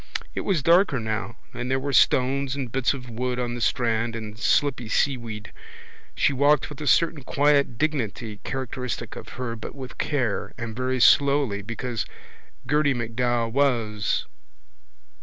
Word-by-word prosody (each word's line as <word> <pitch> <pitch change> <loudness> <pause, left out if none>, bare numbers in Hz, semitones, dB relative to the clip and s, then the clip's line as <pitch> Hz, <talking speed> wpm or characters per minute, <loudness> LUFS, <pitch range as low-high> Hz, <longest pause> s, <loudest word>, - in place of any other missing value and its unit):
It - - -2
was 180 -8 0
darker 170 -4 +4
now 110 0 -3 0.2
and 125 +1 -4
there 130 0 +1
were 140 +1 -3
stones 135 +1 +3
and 130 -4 -4
bits 135 +2 +1
of 125 -2 -9
wood 125 +1 -2
on 120 -1 -2
the 120 - -5
strand 115 -1 +1
and 110 -2 -6
slippy 125 +1 +1
seaweed. 115 -5 -1 0.6
She - - +2
walked 145 +1 +3
with 150 - -9
a 150 - -4
certain 165 0 +3
quiet 140 -2 +2
dignity 115 -8 -2
characteristic 125 -2 -4
of - - -9
her 120 -2 -3
but 110 - -8
with 130 -2 -9
care 130 -8 -1
and 115 -2 -5
very 130 +1 -1
slowly 140 -5 +4
because—because 115 +2 -4 0.6
Gerty 145 -1 +3
MacDowell 120 0 0
was... 115 -6 +1
125 Hz, 150 wpm, -25 LUFS, 115-140 Hz, 0.6 s, darker